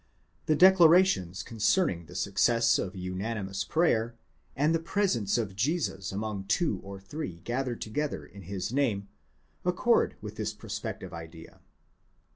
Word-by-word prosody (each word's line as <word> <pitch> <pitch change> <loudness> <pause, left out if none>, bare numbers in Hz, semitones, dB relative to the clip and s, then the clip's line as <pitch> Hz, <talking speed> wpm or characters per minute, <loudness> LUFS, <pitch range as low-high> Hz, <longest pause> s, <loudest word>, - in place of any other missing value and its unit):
The 155 - +4
declarations 175 - +5
concerning 110 - +1
the 90 - -12
success 115 +4 +2
of 95 0 -4
unanimous 95 +2 -3
prayer, 120 - +1 0.4
and 150 +5 +2
the 165 - +2
presence 165 - 0
of 105 -5 -2
Jesus 120 - -1
among 100 -1 -4
two 105 - +1
or 100 0 -8
three 95 - -6
gathered 125 0 -2
together 150 +7 -3
in 100 +2 -13
his 95 +3 -4
name, 110 -8 0 0.5
accord 180 +7 +2
with 105 0 -8
this 105 0 -2
prospective - - -6
idea. 80 0 -10
110 Hz, 130 wpm, -29 LUFS, 95-150 Hz, 0.5 s, declarations